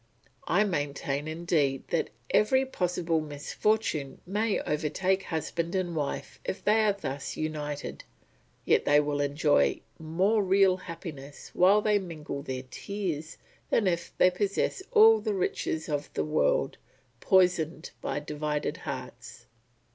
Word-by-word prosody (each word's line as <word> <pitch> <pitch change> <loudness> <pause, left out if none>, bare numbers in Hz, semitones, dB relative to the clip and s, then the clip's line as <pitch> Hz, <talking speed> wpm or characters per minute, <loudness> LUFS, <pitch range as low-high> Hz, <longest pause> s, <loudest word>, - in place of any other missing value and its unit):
I 210 - +4
maintain 145 -5 -2
indeed 155 -4 0
that 170 - 0 0.2
every 260 +5 +4
possible 175 -8 -1
misfortune 150 0 -1
may 210 +3 0
overtake 180 +6 0
husband 170 +1 -3
and 180 -3 -1
wife 145 -3 -3
if 190 - -4
they 215 +1 +4
are 205 - +3
thus 140 -8 -5
united, 150 -2 -4 0.6
yet - - +4
they 145 0 +5
will 145 -1 0
enjoy 145 - +2 0.2
more 185 +7 +1
real 190 -1 +4
happiness 155 -6 -9
while 200 +4 +5
they 210 -1 +3
mingle 155 -6 -6
their 130 -2 -5
tears, 175 -7 -4 0.3
than 225 - +2
if 170 -2 0
they 180 - +5
possessed 200 - -1
all 445 0 +7
the 215 -3 -1
riches 160 -3 -2
of 145 -1 -3
the - - 0
world, - - +1 0.4
poisoned 180 -4 +2
by - - -2
divided 150 0 -3
hearts. - - -8
165 Hz, 130 wpm, -28 LUFS, 150-195 Hz, 0.6 s, all